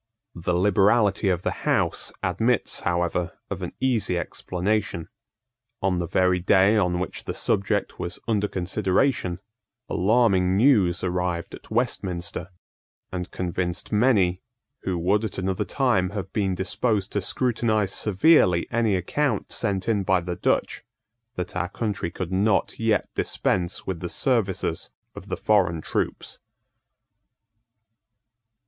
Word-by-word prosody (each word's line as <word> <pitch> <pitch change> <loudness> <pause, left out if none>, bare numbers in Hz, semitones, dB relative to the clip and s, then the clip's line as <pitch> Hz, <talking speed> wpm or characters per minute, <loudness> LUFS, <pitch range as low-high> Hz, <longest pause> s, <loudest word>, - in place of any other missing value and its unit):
The 85 +1 -2
liberality 100 +2 +3
of 90 -1 0
the - - -3
House - - +1
admits 110 +7 0
however 85 0 -1 0.2
of - - -4
an - - -5
easy 115 -8 +1
explanation. 90 0 -2 0.7
On 95 -2 0
the 85 - -2
very 90 +2 +2
day 95 +3 +4
on 90 -4 +1
which 90 - -5
the - - -4
subject 100 0 0
was 85 - -4
under 105 -3 +1
consideration, 95 +1 0 0.5
alarming 95 -3 +3
news 105 -8 +4
arrived 90 -1 -2
at - - -11
Westminster, 95 -7 -2 0.6
and 90 -1 -4
convinced 90 0 -3
many, 105 -5 +3 0.4
who 95 -2 -2
would 100 +6 +1
at 110 - -4
another 95 0 -1
time 120 -10 +1
have 95 -1 -5
been 95 -3 0
disposed 100 +2 -1
to 100 - -1
scrutinise 110 -2 0
severely 95 - +3
any 115 -3 +2
account 110 - -1
sent 100 -4 -1
in 110 -3 +2
by 95 -1 +2
the 90 0 -4
Dutch, - - 0 0.5
that 90 - -5
our 90 - -1
country 100 -4 -3
could 90 +1 -5
not 100 +1 +1
yet 110 -2 +2
dispense 85 -1 -1
with 95 -3 -3
the 90 - -4
services 110 -7 0 0.2
of - - -11
the - - -2
foreign 95 -6 +2
troops. - - -3
95 Hz, 130 wpm, -25 LUFS, 90-110 Hz, 0.7 s, day